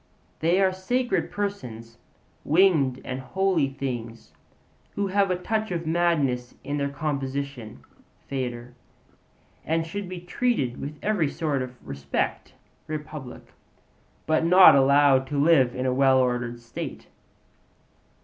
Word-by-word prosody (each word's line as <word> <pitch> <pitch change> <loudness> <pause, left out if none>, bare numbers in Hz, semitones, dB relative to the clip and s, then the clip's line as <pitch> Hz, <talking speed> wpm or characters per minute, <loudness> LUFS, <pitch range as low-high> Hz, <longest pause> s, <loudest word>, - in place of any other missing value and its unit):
They 170 +4 +2
are 190 -1 +3
sacred 245 +7 -1
persons, 120 - -5 0.4
'winged 155 -6 +3
and 130 0 -4
holy 160 +3 0
things' 120 -4 -6 0.6
who 200 - 0
have 195 0 +1
a 180 - +1
touch 220 +4 -2
of 170 -2 -3
madness 155 -7 0
in 145 +2 -3
their 140 -1 -1
composition 140 -4 -4 0.4
(Phaedr.), 125 -2 -4 0.9
and 160 +1 0
should 195 +3 -6
be 185 -1 -6
treated 175 - -1
with 150 +2 -6
every 200 -9 +1
sort 145 -4 -2
of 130 0 -6
respect 70 0 -3 0.3
(Republic), 150 -4 -7 0.8
but 155 +1 +2
not 180 +3 +8
allowed 135 -1 +4
to 145 - -3
live 140 -5 +4
in 130 - -2
a 130 - +1
well 135 0 +4
ordered 125 -2 0
state. 120 -1 -7
140 Hz, 125 wpm, -25 LUFS, 130-175 Hz, 0.9 s, not